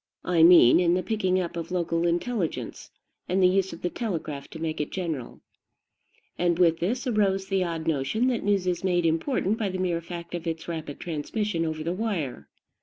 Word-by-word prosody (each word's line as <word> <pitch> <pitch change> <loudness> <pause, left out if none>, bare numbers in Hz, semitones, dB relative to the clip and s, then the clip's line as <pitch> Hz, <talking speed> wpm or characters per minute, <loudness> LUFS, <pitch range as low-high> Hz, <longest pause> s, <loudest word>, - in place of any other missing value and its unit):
I 175 -2 +2
mean 165 -7 +8
in 175 -1 +3
the 185 - 0
picking 185 -2 +1
up 175 -1 -3
of 165 -1 -5
local 170 -1 0
intelligence, 170 - -2 0.4
and 185 +2 +1
the 185 - +6
use 190 +1 +1
of 165 - -10
the 175 - +1
telegraph 160 - -4
to 160 - -10
make 160 -1 -2
it 150 - -3
general. 160 -10 -4 1.0
And 175 -1 +2
with 165 -2 +4
this 235 +10 -1
arose 200 -5 +1
the 190 -1 0
odd 165 -2 -3
notion 160 - 0
that 245 - -1
news 200 -2 +1
is 180 -1 -1
made 175 -2 +1
important 195 - 0
by 210 -3 0
the 185 - -3
mere 175 -2 -1
fact 170 0 -8
of 175 -1 -4
its 165 -1 -4
rapid 160 -4 -5
transmission 170 +3 -2
over 155 0 -3
the 170 +2 -1
wire. 170 - -3
175 Hz, 195 wpm, -26 LUFS, 165-190 Hz, 1.0 s, mean